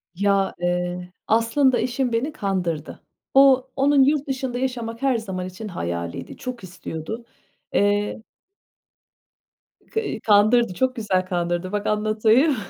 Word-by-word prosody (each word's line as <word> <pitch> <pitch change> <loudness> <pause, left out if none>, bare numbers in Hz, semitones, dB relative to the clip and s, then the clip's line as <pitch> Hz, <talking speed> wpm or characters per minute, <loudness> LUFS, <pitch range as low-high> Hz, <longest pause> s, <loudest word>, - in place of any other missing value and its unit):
Ya, 195 +1 +1
eee, 180 0 -2 0.2
aslında 230 +4 +3
eşim 255 0 -1
beni 265 +7 -1
kandırdı. 180 - -3 0.3
O 265 -1 +6
onun 275 0 +4
yurt 290 +1 +2
dışında 260 -2 -3
yaşamak 235 -3 -3
her 270 -3 +2
zaman 190 -5 -4
için 185 +4 -8
hayaliydi, 85 - -5
çok 250 -4 -6
istiyordu. 180 +4 -7 0.5
Eee 205 +1 +1 1.7
Ka 445 - 0
eee, 400 - -4
kandırdı, 215 +1 +4
çok 255 +6 0
güzel 190 -5 0
kandırdı. 175 0 -2
Bak, 205 0 -2
anlatayım. 215 +7 +3
215 Hz, 125 wpm, -23 LUFS, 185-255 Hz, 1.7 s, O